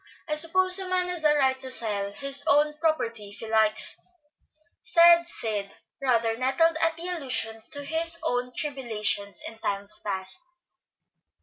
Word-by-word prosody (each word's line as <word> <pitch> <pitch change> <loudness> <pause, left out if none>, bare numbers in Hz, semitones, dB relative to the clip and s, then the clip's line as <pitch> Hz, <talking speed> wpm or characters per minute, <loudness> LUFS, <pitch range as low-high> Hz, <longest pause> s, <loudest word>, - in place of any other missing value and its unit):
I 305 - -2
suppose 365 +5 +4
a 380 -1 -3
man 365 -1 -1
has 350 -3 0
a 300 -1 +3
right 265 -2 +1
to 260 - +2
sell 205 -5 +1
his 275 +5 +1
own 300 +1 +2
property 230 -10 -2
if 205 - -13
he 225 - -9
likes," 220 -1 +3 0.8
said 340 -6 +4
Sid, 210 -9 -5 0.3
rather 230 -4 0
nettled 270 +7 +1
at 330 0 +1
the 340 +2 -7
allusion 255 -10 -3
to 285 -1 -7
his 330 +3 0
own 245 0 -2
tribulations 220 -8 -3
in 225 0 -11
times 200 0 -1
past. 190 - -3
270 Hz, 150 wpm, -25 LUFS, 220-330 Hz, 0.8 s, suppose